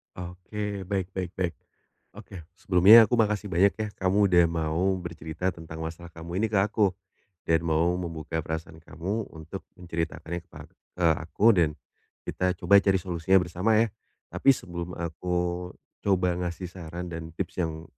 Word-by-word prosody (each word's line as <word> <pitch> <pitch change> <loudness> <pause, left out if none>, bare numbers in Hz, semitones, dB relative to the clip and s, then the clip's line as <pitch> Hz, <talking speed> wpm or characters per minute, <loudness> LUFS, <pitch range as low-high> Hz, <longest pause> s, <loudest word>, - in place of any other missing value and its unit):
Oke, 95 +3 -5
baik 95 -1 -2
baik 95 -1 -5
baik, 90 -3 -1 0.6
oke. 85 -5 -11
Sebelumnya 100 +5 +7
aku 120 - +2
makasih 105 -2 +1
banyak 95 +3 +4
ya, 110 -1 -3
kamu 95 +2 +3
sudah 85 -1 +6
mau 80 0 -1 0.2
bercerita 85 +1 -4
tentang 80 -2 -8
masalah 85 +1 -7
kamu 85 +3 -6
ini 110 - +2
ke - - +4
aku 100 -1 +2 0.5
dan 80 0 +2
mau 80 +2 +2
membuka 80 -2 -4
perasaan 80 0 -6
kamu 90 +7 -4
untuk 80 +5 -7 0.2
menceritakannya 85 0 -4
kepa - - -11 0.3
ke 90 -2 +2 0.2
aku 85 +6 0
dan 85 -6 +3 0.5
kita 90 0 -1
coba 100 +3 +5
cari 100 -1 +2
solusinya 90 +1 +1
bersama 90 +6 +1
ya. 115 - +3 0.4
Tapi 90 +10 -1
sebelum 85 -6 -6
aku 85 +2 -3 0.7
coba 95 -2 +2
ngasih 90 +1 -4
saran 90 0 -7
dan 80 -1 -6
tips 90 0 -3
yang, 80 -1 -3
90 Hz, 155 wpm, -27 LUFS, 80-95 Hz, 0.7 s, Sebelumnya